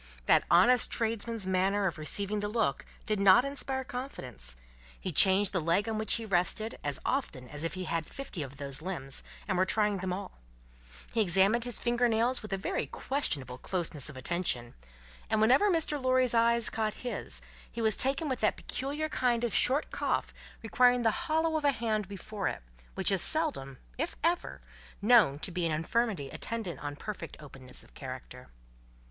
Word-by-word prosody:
That - - +4
honest 235 +8 +5
tradesman's 230 -2 -1
manner 190 +2 +1
of 175 -4 -2
receiving 200 +7 -2
the 205 - -2
look, 210 - 0 0.2
did 215 -2 0
not 200 +6 +6
inspire 275 -1 -2
confidence; 130 - -6 0.4
he 185 - -4
changed 190 +4 +6
the 185 - +1
leg 170 +7 +1
on 220 -1 -2
which 215 - +2
he 230 - -3
rested, 205 +3 0
as 145 -2 +1
often 155 - -2
as 145 +3 -6
if 165 - -3
he 185 - -4
had 165 -3 -2
fifty 270 - -7
of 135 -1 -7
those 140 0 -3
limbs, 145 -7 -4 0.2
and 185 -3 0
were - - +5
trying 210 -2 +1
them 185 0 -3
all; 190 - -6 0.7
he 225 - +2
examined 195 +5 +3
his 245 -2 +2
finger 240 0 +2
nails 235 +3 +2
with 215 - -9
a 195 - 0
very 190 - -2
questionable 140 - -2
closeness 160 -6 -2
of 145 - -10
attention; 130 -5 -1 0.6
and 220 -1 +2
whenever 260 - +5
Mr. 315 -5 0
Lorry's 255 -1 +2
eye 235 0 +4
caught 220 -2 0
his, 245 - -1 0.3
he - - -7
was 220 -2 +3
taken 275 +4 +2
with 260 -3 -2
that 215 - +1
peculiar 290 +4 -3
kind 245 -5 0
of 235 - -1
short 275 +4 +1
cough - - -1 0.3
requiring 245 +2 +4
the 225 - +4 0.2
hollow 320 0 +2
of 305 - -4
a 285 - +4
hand 220 -5 -1
before 200 +1 -5
it, - - -4 0.3
which - - +3
is 195 -3 +3
seldom, 280 - 0 0.2
if 320 +4 -2
ever, 345 +1 0 0.4
known 205 - +5
to 170 - -4
be 180 0 -2
an 165 - +1
infirmity 165 - -1
attendant 210 -10 -4
on 145 0 -5
perfect 185 0 -7
openness 135 -4 -9
of - - -21
character. 130 -1 -9
210 Hz, 180 wpm, -30 LUFS, 170-245 Hz, 0.7 s, not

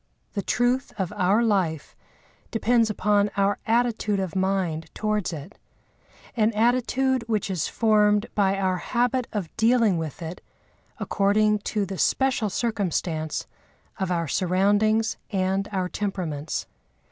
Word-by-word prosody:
The 200 - -1
truth 245 +6 0
of 190 -3 -2
our 200 +6 +3
life 185 -9 0 0.5
depends 230 0 +2
upon 210 -1 +2
our 200 0 +2
attitude 225 -3 +1
of 190 -1 -3
mind 185 -5 -1
towards 215 -3 -1
it—an 205 - -6
attitude 250 +3 +1
which 215 -3 -1
is 180 -5 -1
formed 210 -1 +3
by 195 -1 +2
our 185 -1 0
habit 245 +4 0
of 200 -7 -4
dealing 225 -5 +3
with 160 +1 -5
it 165 +2 -7 0.6
according 210 +1 +2
to 210 -2 0
the 190 -1 -6
special 260 -5 +1
circumstance 180 -8 -2 0.5
of 190 -1 -1
our 170 -2 0
surroundings 205 +6 +2
and 195 0 0
our 185 -2 -1
temperaments. 175 -7 -3
205 Hz, 125 wpm, -25 LUFS, 185-225 Hz, 0.6 s, our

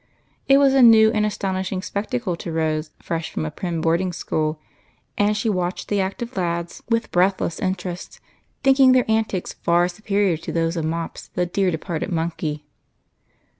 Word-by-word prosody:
It 275 - +6
was 275 -1 +5
a 270 - +5
new 220 -2 +7
and 215 -1 +1
astonishing 190 -2 -3
spectacle 215 -2 -2
to 170 - -6
Rose, 155 -1 -1
fresh 165 -1 -3
from 80 - -3
a 75 - -4
prim 170 -3 -3
boarding 170 +3 +1
school, 155 -2 -2 0.6
and 205 +1 +2
she 220 - -1
watched 185 -3 -2
the 205 -1 +1
active 230 +6 -4
lads 170 -2 -2
with 230 -1 0
breathless 180 -1 +1
interest, 180 -1 -4 0.4
thinking 270 -1 +6
their 255 -1 +4
antics 220 -4 -1
far 175 +1 +2
superior 200 -1 0
to 165 - -7
those 165 0 0
of 165 -2 -2
Mops, 165 +1 -4
the 180 - +1
dear 190 +2 0
departed 165 +2 -3
monkey. 160 -3 -3
185 Hz, 165 wpm, -22 LUFS, 165-210 Hz, 0.6 s, new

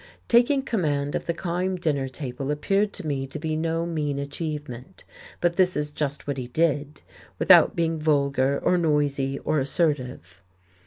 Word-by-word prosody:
Taking 250 +3 +4
command 145 - -1
of - - -3
the 170 - +1
Kyme 180 +2 -2
dinner 145 -5 0
table 130 0 -5
appeared 195 +8 +1
to - - -7
me 135 -3 -2
to 135 - -7
be 155 0 -2
no 165 +1 -1
mean 150 -4 -2
achievement, 145 0 -6 0.4
but 175 -1 0
this 185 -3 +3
is 150 0 -2
just 145 -1 -3
what 140 -1 -3
he 125 - -5
did, 150 +1 0 0.4
without - - +6
being 165 -1 0
vulgar 140 -3 +2
or 180 - +3
noisy 145 -4 0
or 155 - 0
assertive. 130 - -2
150 Hz, 160 wpm, -25 LUFS, 140-170 Hz, 0.4 s, without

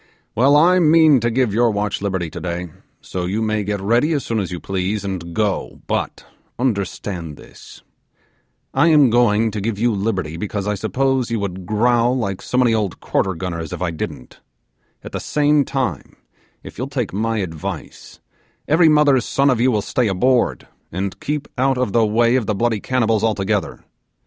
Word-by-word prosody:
Well, 135 +6 +4
I 175 +5 +5
mean 160 -4 +5
to 120 +1 0
give 120 -2 +1
your 120 +2 +3
watch 105 -1 -2
liberty 95 -5 -2
today, 90 -1 -5 0.3
so 90 -1 -4
you 100 +4 -1
may 110 -1 0
get 100 0 -2
ready 120 +11 +2
as 145 - -2
soon 115 -1 -1
all 100 - -1
you 90 0 -6
please, 95 +4 -2
and 85 -3 -5
go; 105 -3 -1
but - - -3 0.3
understand 100 - -3
this, - - -15 0.9
I 140 +5 +3
am 150 -6 +5
going 115 -2 +3
to 105 -1 -4
give 110 0 -2
you 115 +2 +1
liberty 95 -6 -2
because 100 +1 -4
I 105 - 0
suppose 125 +5 0
you 115 -1 -1
would 95 -2 -5
growl 120 +3 +2
like 100 -6 -3
so 125 - -3
many 125 -3 +4
old 105 -5 -1
quarter 95 -2 -1
gunners 85 -2 -5
if 90 0 -4
I 85 - -1
didn't; 80 -5 -7 0.6
at - - -9
the - - -4
same 150 0 +2
time, 125 - -3 0.5
if - - -11
you'll 130 - -2
take 125 -8 -3
my 115 +3 -1
advice, 80 -6 -6 0.5
every 160 +2 +5
mother's 145 -5 +4
son 140 0 +2
of 120 -2 0
you 130 - +4
will 105 -3 0
stay 125 +2 0
aboard 100 - +1 0.2
and 95 +2 -4
keep 150 0 -3
out 135 0 +2
of 125 -6 -1
the 115 - +4
way 115 +3 +3
of 120 - -2
the 105 - 0
bloody 115 +1 0
cannibals 115 -3 0
altogether. 105 -2 -1
110 Hz, 185 wpm, -20 LUFS, 95-125 Hz, 0.9 s, I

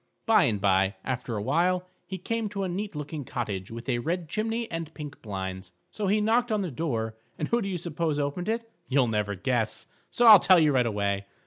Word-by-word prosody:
By 225 -1 +5
and 105 -3 0
by, 95 0 +2
after 125 -3 -3
a 100 - -3
while, 180 +8 +1 0.2
he 190 - -4
came 225 +4 -2
to 200 -1 -3
a - - -1
neat 195 +1 -4
looking 150 0 -5
cottage 105 -6 -4
with 115 +2 -8
a 120 -3 +1
red 165 +5 -2
chimney 225 +6 -1
and 165 -1 -4
pink 145 -2 -8
blinds. 95 -3 -5 0.2
So 210 -2 -3
he 210 +3 +3
knocked 230 +3 +2
on 215 -1 +1
the 180 - -4
door, 115 -6 -2 0.2
and 150 - -3
who 235 0 +2
do 195 - -3
you 185 - -2
suppose 165 -2 -2
opened 145 +7 -2
it? 230 +1 -1 0.2
You'll 135 -1 +4
never 105 -3 -1
guess, 110 +3 -1 0.2
so 240 - +2
I'll 215 -4 +11
tell 185 +1 +6
you 155 -3 +4
right 125 -3 +3
away. 100 -2 -1
150 Hz, 220 wpm, -27 LUFS, -, 0.2 s, I'll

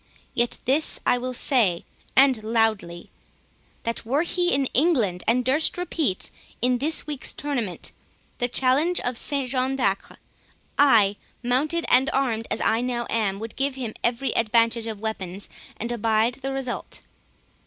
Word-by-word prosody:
—Yet 240 0 0
this 285 +5 +2
will 250 +1 +1
I - - -5
say, 230 -9 +1 0.3
and 260 -3 +5
loudly—that 220 +1 -3
were 270 +7 +1
he 350 0 0
in 275 0 +2
England, 240 - +2
and 245 +2 +2
durst 290 +7 +2
repeat, 320 - -1 0.3
in 250 +1 +2
this 310 +4 0
week's 295 -3 -2
tournament, 245 -11 -3 0.5
the 245 - +2
challenge 270 +8 +2
of 245 0 -2
St 275 +2 0
John 260 +1 0
de 245 -7 +3
Acre, 195 - -10 0.6
I, 220 -8 +5 0.3
mounted 295 +8 +1
and 265 +3 +4
armed 235 -5 0
as 220 - -2
I 225 +1 +2
now 245 -1 -2
am, 210 -4 0
would 225 +2 -7
give 275 0 0
him 240 -5 -4
every 240 +3 0
advantage 230 0 +2
of 220 -2 -5
weapons, 200 -3 -5 0.3
and 235 +2 -4
abide 225 +2 +1
the 270 0 -3
result." 270 -2 -4
245 Hz, 150 wpm, -24 LUFS, 225-270 Hz, 0.6 s, and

